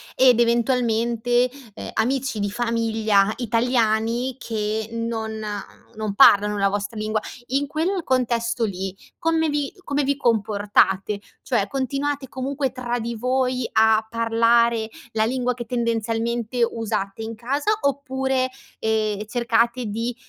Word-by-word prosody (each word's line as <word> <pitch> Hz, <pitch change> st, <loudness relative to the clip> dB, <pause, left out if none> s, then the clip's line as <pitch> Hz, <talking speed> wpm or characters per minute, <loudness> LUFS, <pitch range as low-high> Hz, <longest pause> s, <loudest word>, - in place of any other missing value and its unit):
ed 250 Hz, -2 st, +5 dB
eventualmente, 240 Hz, 0 st, +2 dB, 0.2 s
ehm, -, -, -7 dB
amici 255 Hz, 0 st, 0 dB
di 205 Hz, 0 st, 0 dB
famiglia, 225 Hz, -3 st, +1 dB
italiani, 235 Hz, +1 st, +1 dB
che 220 Hz, -1 st, -2 dB
non 225 Hz, -1 st, -3 dB, 0.6 s
non 215 Hz, -2 st, -2 dB
parlano 205 Hz, +1 st, +6 dB
la 195 Hz, -, +3 dB
vostra 205 Hz, +3 st, -3 dB
lingua. 215 Hz, 0 st, 0 dB, 0.3 s
In 275 Hz, +3 st, 0 dB
quel 335 Hz, +5 st, -1 dB
contesto 235 Hz, -2 st, 0 dB
lì, 190 Hz, -1 st, -4 dB, 0.2 s
come 325 Hz, -2 st, +1 dB
vi 290 Hz, -1 st, -1 dB
come 285 Hz, -2 st, 0 dB
vi 280 Hz, +1 st, +1 dB
comportate? 205 Hz, -3 st, +2 dB, 0.2 s
Cioè, 220 Hz, -6 st, 0 dB
continuate, 275 Hz, +2 st, -2 dB
comunque, 265 Hz, +1 st, -2 dB
tra 245 Hz, -1 st, -3 dB
di 235 Hz, +1 st, -4 dB
voi, 255 Hz, +1 st, 0 dB
a 220 Hz, 0 st, +4 dB
parlare 230 Hz, 0 st, +2 dB, 0.2 s
la 220 Hz, 0 st, +1 dB
lingua 250 Hz, +1 st, 0 dB
che, 240 Hz, -1 st, -7 dB
tendenzialmente, 230 Hz, 0 st, 0 dB
usate 215 Hz, -2 st, -3 dB
in 225 Hz, +1 st, -5 dB
casa, 275 Hz, -, -1 dB
oppure, 265 Hz, -2 st, 0 dB, 0.3 s
ehm, 215 Hz, -1 st, 0 dB
cercate 235 Hz, +2 st, +1 dB
di, 230 Hz, +3 st, -3 dB
235 Hz, 125 wpm, -23 LUFS, 220-255 Hz, 0.6 s, parlano